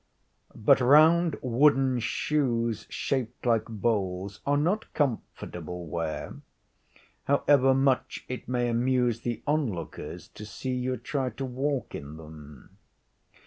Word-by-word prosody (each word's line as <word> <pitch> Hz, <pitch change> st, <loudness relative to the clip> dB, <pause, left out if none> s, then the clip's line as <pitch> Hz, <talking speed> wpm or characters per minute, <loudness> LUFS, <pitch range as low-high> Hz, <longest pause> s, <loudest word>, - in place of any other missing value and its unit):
But 130 Hz, +5 st, +4 dB
round 155 Hz, +5 st, +5 dB
wooden 130 Hz, 0 st, +3 dB
shoes, 120 Hz, -2 st, -1 dB
shaped 130 Hz, -4 st, -3 dB
like 115 Hz, -2 st, +2 dB
bowls, 100 Hz, -4 st, -2 dB
are 145 Hz, 0 st, +3 dB
not 180 Hz, +9 st, 0 dB
comfortable 90 Hz, -, -3 dB
wear, 80 Hz, 0 st, -4 dB, 0.9 s
however 135 Hz, -1 st, +4 dB
much 135 Hz, -1 st, +1 dB
it 125 Hz, -, -6 dB
may 125 Hz, -1 st, 0 dB
amuse 120 Hz, 0 st, +1 dB
the 120 Hz, -1 st, -4 dB
onlooker 140 Hz, -, -2 dB
to 105 Hz, -, -12 dB
see 130 Hz, +4 st, -4 dB
you 125 Hz, 0 st, -1 dB
try 130 Hz, +3 st, -2 dB
to 125 Hz, +4 st, -5 dB
walk 135 Hz, +2 st, -2 dB
in 75 Hz, +2 st, -7 dB
them. 75 Hz, -3 st, -13 dB
125 Hz, 115 wpm, -27 LUFS, 105-135 Hz, 0.9 s, round